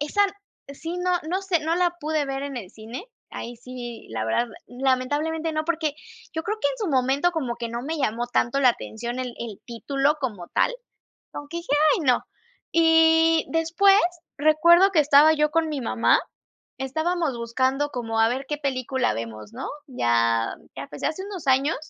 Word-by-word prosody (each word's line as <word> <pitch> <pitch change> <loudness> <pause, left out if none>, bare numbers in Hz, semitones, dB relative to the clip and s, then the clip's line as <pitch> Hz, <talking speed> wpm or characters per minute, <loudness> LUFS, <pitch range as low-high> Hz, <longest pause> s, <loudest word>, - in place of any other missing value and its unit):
esa 300 +8 +1 0.5
Sí, 330 +5 -6
no 360 0 0 0.2
no 375 +2 0
sé, 375 -4 0
no 320 +2 0
la 350 -1 +2
pude 305 -2 -1
ver 270 0 -3
en 275 -3 -4
el 190 -5 -8
cine. 225 +9 -8 0.3
Ahí 240 0 -7
sí, 240 -1 -8
la 110 -1 -3
verdad, 235 - +1 0.2
lamentablemente 290 +6 -1
no, 310 0 -1
porque 315 -3 -1 0.4
yo 320 - -2
creo 430 +5 -3
que - - +2
en - - -4
su 425 - -2
momento 270 +4 +2
como 265 -8 -3
que 235 -1 -4
no 235 0 -3
me 320 +4 -3
llamó 240 -3 -1
tanto 245 +2 +1
la 255 - +6
atención 235 +2 -6
el 255 -1 -2
el 225 -4 -7
título 275 +5 0
como 205 -10 -4
tal, - - +1 0.6
como 290 - -7
que 340 - -6
dije: 340 -4 -5 0.2
"Ay - - -3
no". 250 -2 +3 0.5
Y 325 0 +4
después 335 +5 +4 0.4
recuerdo 340 +5 +5
que 335 - +4
estaba 295 +2 +6
yo 300 -1 +2
con 320 +1 +1
mi 285 -3 -3
mamá, 230 -1 +3 0.6
estábamos 315 +2 -1
buscando 260 +5 0
como 225 -4 -2
a 225 - +5
ver 260 +3 -2
qué 295 -1 -3
película 260 -2 -1
vemos, 110 -2 -7
¿no? - - -5 0.2
Ya 115 - +1 0.2
ya 135 - -5
empecé 145 +1 -5
hace 315 +6 -3
unos 380 -7 -7
años, 270 +4 +3
280 Hz, 185 wpm, -24 LUFS, 240-325 Hz, 0.6 s, la